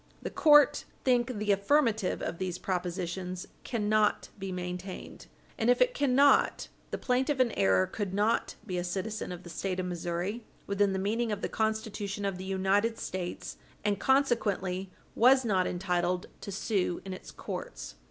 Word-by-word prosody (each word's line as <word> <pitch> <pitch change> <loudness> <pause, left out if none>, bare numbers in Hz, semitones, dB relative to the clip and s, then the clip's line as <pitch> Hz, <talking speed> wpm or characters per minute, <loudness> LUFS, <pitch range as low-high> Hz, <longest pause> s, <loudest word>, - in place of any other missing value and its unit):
The - - -4
court 295 -2 +5 0.2
think 245 -2 +2
the 210 0 +1
affirmative 220 -1 +2
of 165 - -4
these 180 -2 -2
propositions 180 0 -3 0.2
cannot 215 -2 +1
be 195 -1 -4
maintained. 180 +1 -6 0.3
And 225 - +2
if 245 - +5
it - - +4
cannot, 280 - +3 0.2
the - - -3
plaintiff 265 +2 0
in 250 -3 +4
error 95 - +3
could 205 -4 -4
not 210 +4 +1
be 180 -4 -2
a - - -2
citizen 190 +4 -3
of 180 0 -7
the 175 - -10
State 185 0 -2
of 185 - -1
Missouri 175 +5 -3 0.2
within 200 0 +1
the - - -1
meaning 220 +4 0
of 205 -1 -3
the - - -1
Constitution 220 -2 -2
of 195 -2 -2
the 190 - -6
United 195 +4 +1
States, 180 -1 -5 0.3
and, 205 -1 +1
consequently, 205 -9 +1 0.2
was 260 +2 +5
not 190 -4 +2
entitled 180 0 0 0.2
to 200 - -6
sue 195 -3 -1
in 190 - -5
its 185 - -9
courts. - - -6
200 Hz, 160 wpm, -30 LUFS, 180-230 Hz, 0.3 s, court